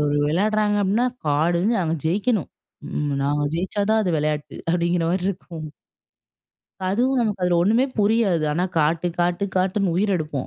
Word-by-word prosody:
ஒரு 145 Hz, 0 st, +1 dB
வெளையாட்றாங்க 210 Hz, +5 st, +1 dB
அப்டின்னா, 215 Hz, +6 st, +2 dB, 0.2 s
கார்டயும் 170 Hz, +9 st, +2 dB
அவன் 160 Hz, -1 st, -2 dB
ஜெயிக்கணும் 200 Hz, +3 st, 0 dB, 0.8 s
நாங்க 145 Hz, +1 st, 0 dB
ஜெயிச்சா 190 Hz, +4 st, -2 dB
தான் 220 Hz, 0 st, +4 dB
அது 180 Hz, -, 0 dB
வெளையாட்டு. 150 Hz, 0 st, -2 dB, 0.2 s
அப்படிங்கிற 170 Hz, 0 st, +1 dB
மாதிரி 180 Hz, +1 st, -1 dB
இருக்கும். 170 Hz, -4 st, -8 dB, 1.2 s
அதுவும் 250 Hz, +7 st, +1 dB
நமக்கு 210 Hz, -5 st, -1 dB
அதுல 180 Hz, -1 st, +2 dB
ஒண்ணுமே 225 Hz, +7 st, +3 dB
புரியாது. 205 Hz, -6 st, +2 dB
ஆனா 175 Hz, +4 st, 0 dB
காட்டு 160 Hz, +3 st, +1 dB
காட்டு 175 Hz, +2 st, +1 dB
காட்டுன்னு 185 Hz, 0 st, +1 dB
உயிர் 200 Hz, +2 st, +1 dB
எடுப்போம். 150 Hz, -5 st, -4 dB
180 Hz, 145 wpm, -22 LUFS, 165-210 Hz, 1.2 s, தான்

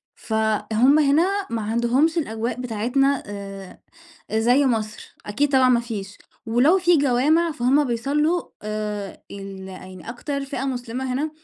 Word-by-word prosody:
فهُم 220 Hz, +5 st, +2 dB
هنا 350 Hz, +8 st, +2 dB
ما 230 Hz, -1 st, -2 dB
عندهُمش 240 Hz, +9 st, +1 dB
الأجواء 230 Hz, -4 st, -2 dB
بتاعتنا 250 Hz, +4 st, 0 dB
آآ 195 Hz, -2 st, -8 dB, 0.5 s
زي 245 Hz, +6 st, +3 dB
مصر. 220 Hz, -3 st, -3 dB
أكيد 280 Hz, +8 st, 0 dB
طبعًا 260 Hz, -1 st, +5 dB
ما 245 Hz, -2 st, +4 dB
فيش. 205 Hz, -4 st, -7 dB, 0.3 s
ولو 250 Hz, +11 st, +4 dB
فيه 350 Hz, -3 st, +4 dB
جوامِع 290 Hz, +5 st, +3 dB
فهُم 275 Hz, +1 st, +2 dB
بيصلّوا 290 Hz, +8 st, 0 dB, 0.2 s
آآ 210 Hz, -2 st, -4 dB
ال 195 Hz, -1 st, -8 dB
يعني 185 Hz, -1 st, -11 dB
أكتر 280 Hz, +4 st, -4 dB
فئة 270 Hz, -1 st, -4 dB
مسلِمة 255 Hz, 0 st, -3 dB
هنا 295 Hz, +5 st, -1 dB
245 Hz, 130 wpm, -23 LUFS, 215-280 Hz, 0.5 s, طبعًا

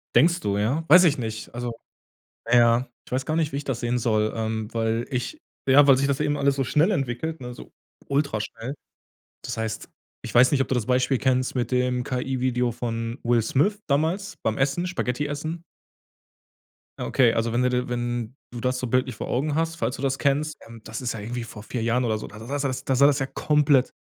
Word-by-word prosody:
Denkst 170 Hz, +3 st, +5 dB
du, 100 Hz, -, -1 dB
ja? 125 Hz, +10 st, 0 dB
Weiß 180 Hz, 0 st, +8 dB
ich 150 Hz, -5 st, +4 dB
nicht. 110 Hz, -1 st, -5 dB
Also 120 Hz, 0 st, -3 dB, 0.8 s
na 120 Hz, -, +4 dB
ja, 120 Hz, +2 st, +4 dB, 0.2 s
ich -, -, -18 dB
weiß 130 Hz, +1 st, -1 dB
gar 155 Hz, -, -1 dB
nicht, 160 Hz, -2 st, +1 dB
wie 140 Hz, -, -3 dB
ich 145 Hz, -, -4 dB
das 130 Hz, -4 st, -3 dB
sehen 120 Hz, +1 st, 0 dB
soll, 110 Hz, -2 st, +1 dB
ähm, 110 Hz, -1 st, -2 dB
weil 115 Hz, 0 st, 0 dB
ich 140 Hz, -, -3 dB, 0.3 s
ja, 140 Hz, +2 st, +7 dB
weil 135 Hz, -, +7 dB
sich 140 Hz, -, +1 dB
das 140 Hz, -1 st, 0 dB
eben 145 Hz, 0 st, 0 dB
alles 140 Hz, 0 st, +2 dB
so 135 Hz, -, 0 dB
schnell 155 Hz, -, +2 dB
entwickelt, 140 Hz, +1 st, -2 dB
ne, 125 Hz, 0 st, -6 dB
so -, -, -12 dB, 0.4 s
ultraschnell. 135 Hz, -2 st, -2 dB, 0.7 s
Das -, -, -4 dB
heißt, 110 Hz, -1 st, -4 dB, 0.3 s
ich -, -, -7 dB
weiß 125 Hz, +1 st, +7 dB
nicht, 145 Hz, -, +2 dB
ob 135 Hz, -, 0 dB
du 130 Hz, -, 0 dB
das 120 Hz, -3 st, 0 dB
Beispiel 130 Hz, +1 st, +2 dB
kennst 130 Hz, 0 st, +1 dB
mit 125 Hz, 0 st, -1 dB
dem 125 Hz, 0 st, +1 dB
KI-Video 125 Hz, -2 st, -1 dB
von 115 Hz, 0 st, -3 dB
Will 120 Hz, -1 st, +3 dB
Smith 185 Hz, -, +1 dB
damals 160 Hz, +8 st, 0 dB
beim 110 Hz, -1 st, 0 dB
Essen, 140 Hz, +7 st, 0 dB
Spaghetti 145 Hz, -5 st, -2 dB
essen? 155 Hz, +3 st, -4 dB, 1.4 s
Ja, -, -, -3 dB
okay, 120 Hz, -3 st, +4 dB
also 115 Hz, 0 st, -1 dB
wenn 120 Hz, -, +2 dB
du 125 Hz, -, +3 dB
de 125 Hz, 0 st, 0 dB
wenn 120 Hz, -1 st, -3 dB, 0.2 s
du 120 Hz, -, -6 dB
das 125 Hz, +1 st, 0 dB
so 125 Hz, -, -3 dB
bildlich 130 Hz, 0 st, 0 dB
vor -, -, -6 dB
Augen 145 Hz, +4 st, 0 dB
hast, 165 Hz, +1 st, -1 dB
falls 130 Hz, -, -1 dB
du -, -, -9 dB
das 135 Hz, -1 st, 0 dB
kennst, 150 Hz, +2 st, 0 dB
ähm, 115 Hz, -1 st, -12 dB
das 110 Hz, -, -6 dB
ist 125 Hz, -2 st, -2 dB
ja 110 Hz, -, -6 dB
irgendwie 120 Hz, +2 st, -4 dB
vor 105 Hz, -2 st, -10 dB
4 120 Hz, +1 st, -4 dB
Jahren 120 Hz, +2 st, +1 dB
oder 110 Hz, -3 st, 0 dB
so, 105 Hz, -, -7 dB
da 105 Hz, -, -12 dB
da 110 Hz, -, -9 dB
da 140 Hz, +3 st, -3 dB
sah 140 Hz, -, 0 dB
das 130 Hz, 0 st, -4 dB
da 135 Hz, -, 0 dB
sah 140 Hz, +2 st, +6 dB
das 145 Hz, -1 st, +2 dB
ja 135 Hz, -, 0 dB
komplett 145 Hz, -1 st, +2 dB
125 Hz, 230 wpm, -25 LUFS, 120-140 Hz, 1.4 s, Weiß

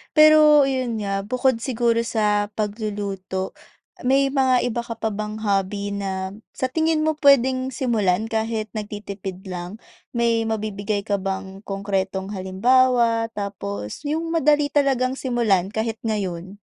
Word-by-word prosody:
Pero, 305 Hz, -1 st, +7 dB
yun 255 Hz, -4 st, -1 dB
nga 195 Hz, 0 st, -2 dB
bukod 255 Hz, -1 st, +1 dB
siguro 235 Hz, -2 st, +1 dB
sa 210 Hz, -2 st, +1 dB
pagluluto, 205 Hz, -3 st, -3 dB, 0.6 s
may 270 Hz, +1 st, +3 dB
mga 260 Hz, -3 st, +3 dB
iba 240 Hz, -1 st, -1 dB
ka 235 Hz, -1 st, -5 dB
pa 220 Hz, 0 st, -2 dB
bang 210 Hz, +1 st, -4 dB
hobby 200 Hz, 0 st, 0 dB
na 190 Hz, -1 st, -3 dB, 0.2 s
sa 255 Hz, 0 st, -2 dB
tingin 320 Hz, 0 st, +1 dB
mo 315 Hz, -, +3 dB
pwedeng 260 Hz, -2 st, +4 dB
simulan 220 Hz, -5 st, 0 dB
kahit 220 Hz, -1 st, -2 dB
nagtitipid 205 Hz, -3 st, -6 dB
lang? 180 Hz, +1 st, -6 dB, 0.4 s
May 230 Hz, -1 st, +2 dB
mabibigay 210 Hz, -2 st, -2 dB
ka 200 Hz, -2 st, -1 dB
bang 190 Hz, 0 st, -4 dB
konkretong 195 Hz, 0 st, -2 dB
halimbawa? 230 Hz, +4 st, +2 dB
Tapos, 200 Hz, -, -5 dB
yung 325 Hz, +2 st, -2 dB
madali 295 Hz, -2 st, +3 dB
talagang 265 Hz, -2 st, +1 dB
simulan 225 Hz, -8 st, +1 dB
kahit 220 Hz, +2 st, -3 dB
ngayon. 190 Hz, -3 st, -3 dB
220 Hz, 130 wpm, -23 LUFS, 200-255 Hz, 0.6 s, Pero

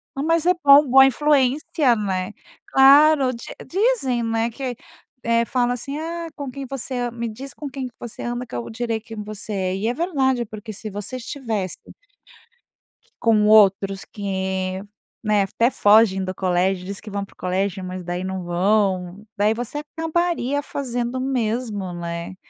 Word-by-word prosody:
Mas 330 Hz, +4 st, +1 dB
é 360 Hz, -, +5 dB
bom, 285 Hz, 0 st, +8 dB
boa 265 Hz, +1 st, +8 dB
influência, 275 Hz, -1 st, +2 dB
né. 190 Hz, -1 st, -2 dB, 0.3 s
Claro, 275 Hz, 0 st, +6 dB
di 235 Hz, -, -9 dB, 0.2 s
dizem, 360 Hz, -, +1 dB
né 225 Hz, +1 st, 0 dB
que 250 Hz, +1 st, -5 dB, 0.5 s
eh, 230 Hz, 0 st, +2 dB
fala 245 Hz, 0 st, +1 dB
assim: 275 Hz, +4 st, -5 dB
"Ah, 335 Hz, +1 st, -4 dB
com 280 Hz, -2 st, -5 dB
quem 275 Hz, +1 st, -7 dB
você 265 Hz, -1 st, -4 dB
an 245 Hz, -1 st, -1 dB
me 235 Hz, 0 st, -4 dB
diz 260 Hz, +4 st, -9 dB
com 295 Hz, -, -7 dB
quem 265 Hz, -1 st, -5 dB
que 240 Hz, -, -14 dB
você 240 Hz, -1 st, -8 dB
anda, 240 Hz, +1 st, -3 dB
que -, -, -9 dB
eu 120 Hz, -, -4 dB
direi 230 Hz, -1 st, -2 dB
quem 220 Hz, -1 st, -8 dB
você 210 Hz, 0 st, -7 dB
é". 185 Hz, -1 st, -1 dB
E 205 Hz, +4 st, -2 dB
é 240 Hz, -, +1 dB
verdade, 265 Hz, -7 st, 0 dB
porque 215 Hz, +1 st, -8 dB
se 215 Hz, +2 st, -7 dB
você 205 Hz, +5 st, -6 dB
estivesse 230 Hz, -, -4 dB, 1.4 s
com 215 Hz, -2 st, +4 dB
outros 195 Hz, -2 st, +4 dB
que, 190 Hz, -2 st, -3 dB, 0.4 s
né, 210 Hz, -1 st, +3 dB
até 230 Hz, +6 st, +1 dB
fogem 205 Hz, -4 st, +4 dB
do 185 Hz, 0 st, -4 dB
colégio, 180 Hz, 0 st, 0 dB
diz 195 Hz, +1 st, -6 dB
que 210 Hz, -, -10 dB
vão 200 Hz, 0 st, -3 dB
para -, -, -22 dB
o -, -, -42 dB
colégio, 190 Hz, +1 st, -1 dB
mas 185 Hz, 0 st, -6 dB
daí 175 Hz, +1 st, -3 dB
não 190 Hz, -1 st, -4 dB
vão. 185 Hz, +1 st, 0 dB
Daí 210 Hz, +2 st, +2 dB
você 245 Hz, +5 st, -4 dB, 0.2 s
acabaria 325 Hz, -4 st, 0 dB
fazendo 245 Hz, -3 st, -3 dB
o -, -, -2 dB
mesmo, 225 Hz, -7 st, -2 dB
né, 170 Hz, +1 st, -5 dB
230 Hz, 170 wpm, -22 LUFS, 195-265 Hz, 1.4 s, bom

